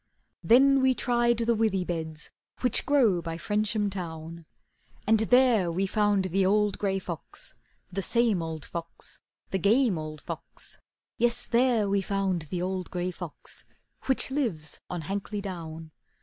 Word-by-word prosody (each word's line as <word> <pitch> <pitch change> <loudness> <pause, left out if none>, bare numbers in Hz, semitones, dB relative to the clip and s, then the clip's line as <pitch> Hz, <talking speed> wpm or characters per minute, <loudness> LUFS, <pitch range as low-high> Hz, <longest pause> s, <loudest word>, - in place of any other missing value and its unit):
Then 270 +3 +6
we 260 -1 +3
tried 240 -1 +2
the 235 0 +2
withy 215 -5 +1
beds 160 -2 -4 0.3
Which 250 -3 +1
grow 235 -11 +4
by 165 -1 -5
Frensham 210 +1 0
town, 165 -3 -7 0.6
And 220 +1 +4
there 225 -5 +4
we 185 +4 0
found 205 -1 +2
the 195 0 +3
old 205 +1 +2
gray 195 -2 0
fox, - - -6 0.4
The 195 +2 -2
same 230 -3 +3
old 160 -2 -5
fox, 170 -1 -8 0.3
The 190 - 0
game 210 0 +3
old 155 -1 -7
fox; - - -9 0.4
Yes, 240 0 +2
there 235 -3 +2
we 200 0 +1
found 195 -2 -1
the 180 -1 -2
old 185 -1 -3
gray 180 0 -2
fox, - - -6 0.4
Which 265 0 +2
lives 215 - -2
on 175 -2 -3
Hankley 200 +4 -3
Down. 165 -5 -7
195 Hz, 150 wpm, -28 LUFS, 175-235 Hz, 0.6 s, Then